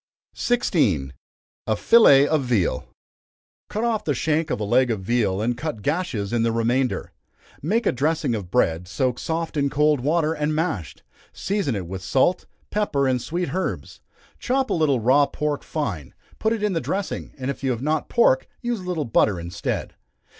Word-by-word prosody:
16. 110 - +1 0.5
A 110 - +2
Fillet 145 - +6
of 155 -1 +2
Veal. 110 - 0 0.8
Cut 215 - -2
off 230 -3 0
the 145 - 0
shank 155 +4 0
of - - -1
a - - -2
leg 125 +5 +3
of 110 -4 -1
veal, 105 -2 0
and 120 +2 0
cut 120 -5 -5
gashes 145 - -1
in 120 - +2
the 115 0 +2
remainder. 120 +3 0 0.5
Make 215 - 0
a - - +3
dressing 145 0 0
of 100 -5 -4
bread, 90 -6 +1
soaked 125 +4 -1
soft 165 0 -3
in 140 -1 +2
cold 150 0 +2
water, 155 +4 +1
and 150 0 -1
mashed; 155 - -3 0.3
season 195 - -1
it 95 -3 -4
with 95 +2 -6
salt, 135 - +1 0.2
pepper, 145 -10 +1
and 125 -2 +1
sweet 175 +6 -3
herbs; 190 +1 -4 0.4
chop 260 +1 0
a - - +3
little 150 -6 +2
raw 135 +5 +4
pork 150 -1 -2
fine, 95 - -4 0.2
put 220 - +1
it 225 -2 -1
in 210 -2 +1
the 165 - 0
dressing, 195 0 -4
and 130 0 -2
if 140 - -10
you 135 - +1
have 125 0 -2
not 155 +1 -1
pork, 135 - +3
use 240 -2 -2
a - - -9
little 175 -5 -2
butter 105 -5 +2
instead. 85 +1 -4
140 Hz, 180 wpm, -23 LUFS, 115-165 Hz, 0.8 s, Fillet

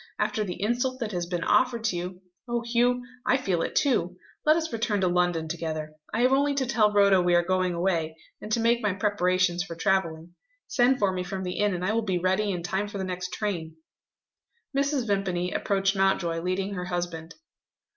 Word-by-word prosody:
After 215 - 0
the 180 -4 -5
insult 245 +5 0
that 225 -4 -3
has 175 -2 -3
been 175 -1 -2
offered 245 -3 +2
to 220 -5 0
you 180 +1 -5 0.3
oh, 235 -1 -1
Hugh, 245 +1 +2 0.2
I 260 - +3
feel 190 -10 -1
it - - -3
too! 180 - +1 0.3
let 310 - +7
us 325 -1 -2
return 220 -2 0
to 185 - +3
London 175 -2 +1
together. 155 -2 -4 0.2
I 225 - 0
have 255 +1 +4
only 280 +1 +2
to 270 -1 0
tell 225 -4 +3
Rhoda 200 -2 +5
we 175 0 +3
are 175 - +4
going 185 0 0
away, 170 -3 0 0.3
and 215 - -7
to 230 - +2
make 235 +1 +2
my 210 -3 +1
preparations 185 -3 +1
for 175 -2 -6
travelling. 170 -2 -1 0.3
Send 255 +1 +3
for 200 -4 +2
me 185 -1 -3
from 190 +1 -5
the 180 0 -4
inn, 205 -2 +2
and 180 +1 -3
I 215 - +1
will 230 - +1
be 190 -5 -1
ready 190 +4 +1
in 180 -3 -2
time 190 +4 -1
for 205 - -6
the 190 - -3
next 180 -1 -4
train." 170 -7 -3 1.0
Mrs. 275 -2 +1
Vimpany 185 -4 -1
approached 195 0 0
Mountjoy, 190 -3 +1
leading 190 +3 -2
her 180 -2 -4
husband. 175 -2 -4
190 Hz, 205 wpm, -27 LUFS, 175-225 Hz, 1.0 s, let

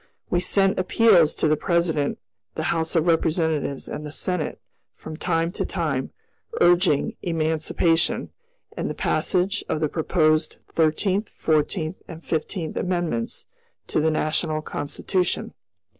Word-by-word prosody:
We 175 - +3
sent 195 +2 +2
appeals 185 -4 +4
to - - +1
the 155 - +4
President 165 -3 0 0.4
the 160 - -2
House 165 0 -1
of 165 -1 +3
Representatives, 160 -4 +1
and 150 - -5
the 150 - -6
Senate, 180 0 -2 0.4
from 155 - -8
time 165 0 0
to - - -3
time, - - -2 0.5
urging 175 -4 +3
emancipation 165 0 0 0.4
and - - -2
the - - -4
passage 195 +3 0
of 160 - 0
the 155 - +1
proposed 155 -1 +1
Thirteenth, 185 +6 +1
Fourteenth, 155 +2 0
and 165 -1 -10
Fifteenth 160 +1 -2
Amendments 175 -11 -2 0.4
to - - 0
the 160 - +3
National 155 0 0
Constitution. 180 +6 -2
165 Hz, 130 wpm, -24 LUFS, 155-180 Hz, 0.5 s, appeals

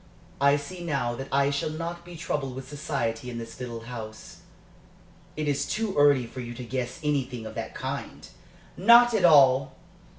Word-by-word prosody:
I 140 +1 +5
see 175 +5 -8
now 140 -7 -1
that 135 +3 -6
I 140 +1 +3
shall 140 +2 -1
not 170 +2 -5
be 175 0 -11
troubled 140 -5 -3
with 130 0 -7
society 130 -5 -3
in 120 - -6
this 115 0 -8
little 120 -2 -6
house." 115 -2 -9 1.0
"It 155 -1 -3
is 140 0 0
too 215 -2 -2
early 145 -3 +5
for 130 - -9
you 120 -1 -6
to 125 - -7
guess 125 +2 -4
anything 130 -6 -1
of 110 - -7
that - - -6
kind." - - -5 0.5
"Not 235 +5 +7
at 205 -5 +3
all! 135 -4 +5
140 Hz, 175 wpm, -27 LUFS, 125-155 Hz, 1.0 s, Not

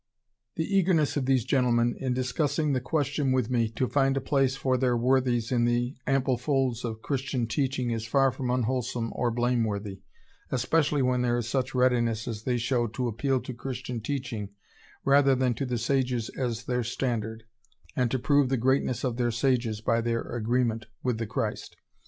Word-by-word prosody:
The 160 - -1
eagerness 185 -6 +2
of 135 -3 -1
these 130 -4 +2
gentlemen 120 -3 +2
in 130 -2 -1
discussing 145 +3 0
the 130 - 0
question 145 0 0
with 130 -2 +1
me, 115 -3 +2
to 130 - 0
find 135 0 +2
a - - +2
place 135 0 +1
for 130 -1 0
their 125 -1 +2
worthies 125 -1 +1
in 120 -2 +2
the 120 +2 0
ample 135 -2 +1
folds 130 -4 0
of 110 -2 -5
Christian 135 -3 -1
teaching 130 0 -1
is 115 -1 -3
far 135 +2 +3
from 130 0 -4
unwholesome 125 -1 -1
or 120 - 0
blameworthy, 110 -5 -1 0.5
especially 145 +2 +1
when 125 -1 +2
there 120 -1 +1
is 120 -2 -2
such 130 +1 -1
readiness 120 -3 +2
as 110 -2 -5
they 125 -1 +1
showed 120 -1 0
to 125 -1 -1
appeal 130 +4 0
to 130 - -6
Christian 125 -1 -5
teaching 115 -5 -4 0.6
rather 140 -1 +5
than 130 -1 +1
to 135 +3 -3
the 125 -1 -1
sages 125 -1 0
as 120 -3 -3
their 125 -1 0
standard, 110 -2 -3 0.5
and 125 -2 +1
to 130 - 0
prove 140 +1 +3
the 135 - +1
greatness 130 +1 +1
of 125 -3 -1
their 120 -1 +1
sages 115 -2 0
by 115 +1 +1
their 115 0 0
agreement 115 -1 -1 0.2
with 125 -3 0
the 115 - -2
Christ.... 110 - -3
125 Hz, 180 wpm, -27 LUFS, 115-135 Hz, 0.6 s, rather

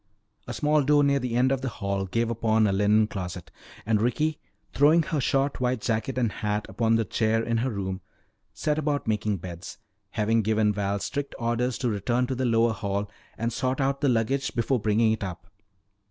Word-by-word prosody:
A 120 - -4
small 150 +6 +2
door 145 +1 +4
near 140 0 +3
the 125 -3 -3
end 130 +2 +3
of 135 -1 0
the 130 - -2
hall 100 -3 -3
gave 115 +4 0
upon 110 -1 +2
a 100 - +2
linen 105 +2 +3
closet. 90 -4 -6 0.3
And 105 -1 +2
Ricky, 150 +7 0 0.3
throwing 155 +4 +5
her 150 -2 -1
short 135 +1 0
white 125 -1 +1
jacket 115 +3 -1
and 120 -4 +1
hat 105 0 -2
upon 115 -1 +1
the 115 0 +1
chair 110 +3 +1
in 115 0 0
her 125 +3 0
room, 95 -3 -4 0.5
set 150 0 -1
about 145 -2 -1
making 105 -2 0
beds, 85 +1 -8 0.3
having 110 +3 +1
given 110 0 +2
Val 100 0 -1
strict 140 +8 -4
orders 120 0 -1
to 125 - -1
return 120 +3 0
to 130 - -3
the 130 0 -1
lower 115 -1 +3
hall 100 -1 -3 0.3
and 115 +1 -2
sort 130 +3 -1
out 135 0 0
the 145 - +3
luggage 125 +4 0
before 125 +1 +1
bringing 110 +1 +2
it 110 - -2
up. 90 -3 -6
115 Hz, 200 wpm, -26 LUFS, 105-130 Hz, 0.5 s, throwing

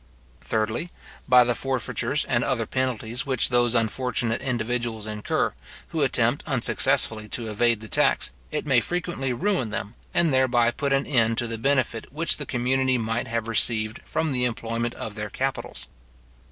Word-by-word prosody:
Thirdly, 110 +9 -1 0.4
by 125 -1 +8
the 120 0 +1
forfeitures 130 -2 -1
and - - +1
other - - 0
penalties 125 -2 -1
which 130 -3 +2
those 120 -1 +2
unfortunate 115 0 0
individuals 120 -3 -2
incur, 105 -1 -1 0.4
who - - -2
attempt - - +2
unsuccessfully 110 -1 +2
to 115 0 -3
evade 115 +1 +2
the 110 - -8
tax, - - +2 0.2
it 150 - -3
may 135 -4 +4
frequently 170 -1 -2
ruin 170 - 0
them, 105 0 -4 0.2
and 165 -4 +2
thereby 120 -2 +3
put 140 +3 -2
an 135 0 +2
end 115 -4 +2
to 120 - +1
the 115 -1 -4
benefit 130 -3 0
which 160 +4 +2
the 145 - -6
community 130 +1 +1
might 115 0 -2
have 115 0 -2
received 110 -1 +1
from 160 0 -1
the 125 -2 0
employment 115 0 -2
of 110 - -6
their 105 -1 -5
capitals. 135 +5 -3
120 Hz, 160 wpm, -25 LUFS, 115-130 Hz, 0.4 s, by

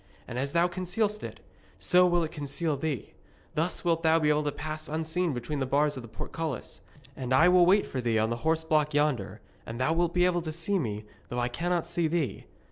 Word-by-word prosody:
And 125 0 -4
as 140 +1 -2
thou 170 +1 +4
concealest 195 +4 -1
it, - - -7 0.4
so 180 0 +4
will 175 -1 +2
it 160 - -4
conceal 150 +1 -2
thee. 140 -3 -4 0.4
Thus 165 +3 -1
wilt 165 -1 +2
thou 160 -1 +4
be 155 -2 +2
able 150 0 +3
to 145 - 0
pass 155 +1 -5
unseen 160 +3 -1
between 130 +3 -3
the 135 - -1
bars 145 +2 +2
of 130 - -6
the 120 - -11
portcullis. 155 +3 -5 0.3
And 130 -2 -5
I 155 +7 +6
will 180 -1 +6
wait 200 +2 +5
for 130 - -4
thee 115 -2 +1
on 110 +1 +1
the 120 - -1
horseblock 155 0 +1
yonder, 145 -9 0 0.2
and 115 +2 -7
thou 130 +5 +2
wilt 170 +1 0
be 180 0 +4
able 175 -1 +2
to 160 -1 -4
see 170 +5 0
me, 105 -7 -3 0.2
though 120 - -4
I 120 0 0
cannot 170 +6 -1
see 170 -2 0
thee. 155 -4 -2
155 Hz, 220 wpm, -28 LUFS, 135-175 Hz, 0.4 s, I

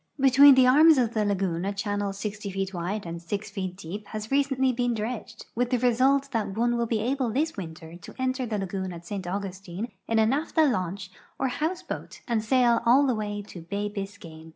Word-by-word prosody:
Between 275 +1 +8
the 260 -1 +6
arms 305 +4 +7
of 240 -3 +1
the 215 - +1
lagoon 190 -4 -1
a 200 - -1
channel 205 0 -2
60 205 +1 -5
feet 195 0 -3
wide 185 +4 -3
and 170 0 -6
6 200 +5 -4
feet 190 -3 -4
deep 200 +3 -7
has 215 0 -6
recentl}' 270 -2 +1
been 245 -1 0
dredged, 225 +1 -5
with 245 +1 0
the 250 - +2
result 260 +3 +2
that 215 -4 -2
one 240 +1 +2
will 235 0 0
be 220 -1 0
able 255 +1 0
this 300 +8 -1
winter 165 -3 -8
to - - -12
enter 260 -1 -1
the 215 -2 -2
lagoon 190 -1 -3
at 170 0 -10
St. 190 0 -5
Augustine 195 +2 -5 0.2
in 225 - +1
a 220 - +5
naphtha 305 +6 +2
launch 185 - -2 0.3
or 265 - 0
house 315 +8 -2
boat - - -7
and 230 -3 0
sail 240 0 +3
all 260 +5 +5
the 260 - +2
way 205 -2 -3
to 185 -4 -10
bay 200 +5 -3
Biscayne. 195 -6 -8
215 Hz, 210 wpm, -26 LUFS, 195-250 Hz, 0.3 s, Between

